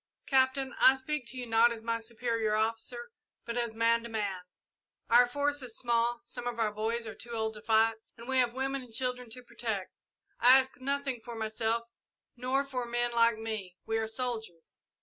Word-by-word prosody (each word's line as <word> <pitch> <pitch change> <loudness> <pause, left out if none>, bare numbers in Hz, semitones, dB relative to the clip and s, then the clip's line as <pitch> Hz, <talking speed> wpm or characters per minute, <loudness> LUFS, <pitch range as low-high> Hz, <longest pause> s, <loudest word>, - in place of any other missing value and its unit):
"Captain, 265 0 +2
I 260 - +8
speak 265 -1 -3
to 245 +3 -5
you 250 - -4
not 230 +1 +5
as 225 -1 -6
my 230 0 -1
superior 225 -1 -1
officer, 225 +2 -2 0.3
but 235 0 -4
as 235 -2 -2
man 230 +1 +3
to 235 - -8
man. 205 -5 -2 0.7
Our 245 +1 +7
force 285 +3 0
is 245 -3 -5
small, 235 0 +1
some 240 0 -6
of 240 -1 -3
our 220 -2 +1
boys 225 +2 -2
are 220 - -6
too 235 -1 -9
old 220 -1 -1
to 210 - -10
fight, 225 +1 +3 0.2
and 235 +1 -11
we 260 -1 +2
have 245 -1 +2
women 270 +1 -1
and 250 -2 -13
children 250 +1 -2
to 250 +2 -10
protect. 220 -6 -4 0.4
I 250 +2 +8
ask 265 -1 -1
nothing 275 -2 -2
for 240 -1 -7
myself, 225 +1 -1 0.5
nor 255 +3 0
for 250 -3 -3
men 240 0 0
like 230 -1 +4
me 215 -5 -5
we 225 0 0
are 220 - -1
soldiers. 220 -7 -4
235 Hz, 195 wpm, -31 LUFS, 225-250 Hz, 0.7 s, I